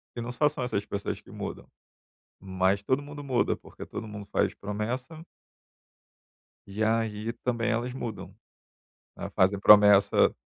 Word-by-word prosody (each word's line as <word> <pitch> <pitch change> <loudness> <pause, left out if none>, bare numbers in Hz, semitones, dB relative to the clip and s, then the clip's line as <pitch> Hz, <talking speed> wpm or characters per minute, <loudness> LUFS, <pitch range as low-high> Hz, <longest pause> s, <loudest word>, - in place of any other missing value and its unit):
e 120 - -4
não 120 +1 -4
só 150 +4 +2
são 150 -3 -5
essas 115 -5 -1
pessoas 100 -1 -4
que - - -20
mudam. - - -7 0.7
Mas, 95 +1 0
todo 130 +7 0
mundo 145 0 -9
muda 130 -3 +1
porque - - -11
todo 110 - -7
mundo 105 -1 -8
faz - - +1
promessa 120 +10 -5 1.5
e 100 +2 -3
aí 110 0 0
também 120 -2 0
elas 120 +2 -2
mudam, 115 -5 -6 0.8
elas - - -6
fazem 95 +2 +3
promessa, 105 0 +6
110 Hz, 145 wpm, -28 LUFS, 100-125 Hz, 1.5 s, promessa